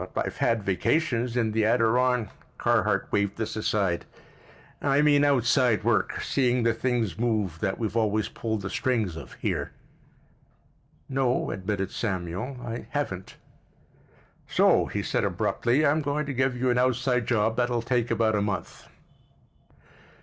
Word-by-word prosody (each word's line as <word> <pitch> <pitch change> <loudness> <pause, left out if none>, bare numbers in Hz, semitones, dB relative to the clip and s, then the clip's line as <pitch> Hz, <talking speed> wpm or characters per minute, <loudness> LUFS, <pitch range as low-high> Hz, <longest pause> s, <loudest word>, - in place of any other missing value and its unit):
"But - - 0
I've - - -6
had 115 -3 +1
vacations, 120 - 0
in 115 -3 +1
the 110 +1 +1
Adiron——" 115 0 +2 0.3
Carhart - - +1
waved 100 -1 0
this 110 -1 -3
aside. 100 -5 0 0.8
"I 140 +1 +3
mean 145 -1 +4
outside 125 -4 +3
work. - - +1
Seeing 125 -3 +1
the 115 0 +3
things 115 -3 -1
move 105 -8 0
that 95 +1 -1
we've 110 -1 -3
always 110 -2 +1
pulled 110 -3 -4
the 95 - -3
strings 110 -9 0
of 80 - -9
here." - - -3 1.3
"No," 130 -2 0
admitted 95 0 -3
Samuel; 95 +5 -3
"I 115 0 -5
haven't." 95 -11 -4 1.1
"So," - - +3
he - - -3
said - - 0
abruptly 130 +6 +1
"I'm 150 +2 +3
going 145 +1 -1
to 140 - -4
give 130 0 0
you 125 0 +1
an 120 - +2
outside 125 -1 +1
job 110 -1 +1
that'll 120 -1 0
take 120 -1 0
about 110 -1 +2
a 105 - +1
month." 100 -2 -4
115 Hz, 145 wpm, -26 LUFS, 105-125 Hz, 1.3 s, mean